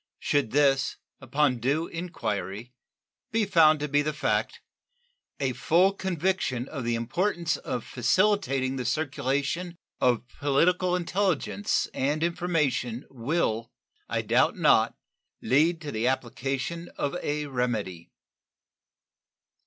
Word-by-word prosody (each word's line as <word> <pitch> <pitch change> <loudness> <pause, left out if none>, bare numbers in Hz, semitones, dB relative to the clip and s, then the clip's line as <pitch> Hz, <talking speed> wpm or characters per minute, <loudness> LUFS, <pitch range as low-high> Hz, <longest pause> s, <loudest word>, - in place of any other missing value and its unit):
Should 145 -5 0
this, 135 0 +2 0.2
upon 135 -1 +1
due 140 +7 +1
inquiry, 120 - -4 0.6
be 225 -1 +2
found 160 -5 +5
to 150 - -1
be 145 0 +2
the 150 +1 -1
fact, - - -1 0.8
a 135 -2 0
full 180 +9 +3
conviction 180 -9 -1
of 135 -4 -5
the 120 0 +1
importance 170 - 0
of 125 -2 -4
facilitating 135 - +1
the 125 - -2
circulation 145 +5 -1 0.2
of 125 -1 +2
political 170 +7 +1
intelligence 190 +2 0
and 145 +4 0
information 150 -8 0
will, 115 -3 -1 0.4
I - - -1
doubt - - +2
not, - - +4 0.4
lead 160 +6 +2
to 150 -2 -5
the 110 +2 -1
application 135 +6 -2
of 140 - -1
a 150 0 -2
remedy. 115 - -3
145 Hz, 115 wpm, -27 LUFS, 125-170 Hz, 0.8 s, found